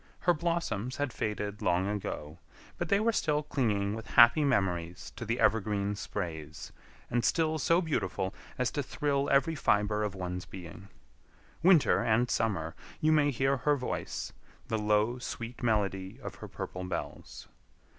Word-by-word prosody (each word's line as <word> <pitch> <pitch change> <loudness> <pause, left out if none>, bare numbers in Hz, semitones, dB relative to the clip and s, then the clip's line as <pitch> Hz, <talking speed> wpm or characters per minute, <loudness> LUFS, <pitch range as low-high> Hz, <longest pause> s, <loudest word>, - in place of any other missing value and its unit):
Her 175 - +4
blossoms 155 - -2
had 145 -4 -1
faded 105 -1 -3
long 90 +2 +2
ago, 85 -6 -4 0.4
but - - -2
they 200 - +4
were 230 +2 +3
still 150 -8 +1
clinging 105 -9 0
with 115 +1 -6
happy 120 +5 +7
memories 90 -9 -1
to 115 - -6
the 115 +2 -1
evergreen 105 -2 +2
sprays, 85 -6 -5 0.4
and 120 0 +1
still 160 -1 +2
so 170 +3 +3
beautiful 95 - -1 0.2
as 125 -1 0
to 145 - -1
thrill 140 +1 -1
every 140 +4 +3
fiber 105 -7 +1
of 105 -2 -2
one's 90 -1 -4
being. 90 +2 -10 0.7
Winter 170 -3 +5
and 120 +2 +2
summer, 85 -8 0 0.3
you 155 - +3
may 150 -2 +4
hear 135 +1 +1
her 145 +3 +2
voice, 125 -3 -4 0.4
the 110 - 0
low, 105 +3 +2
sweet 120 -1 -6
melody 100 -4 0
of - - -5
her - - -8
purple 90 - -6
bells. 90 - -6
110 Hz, 155 wpm, -30 LUFS, 100-140 Hz, 0.7 s, happy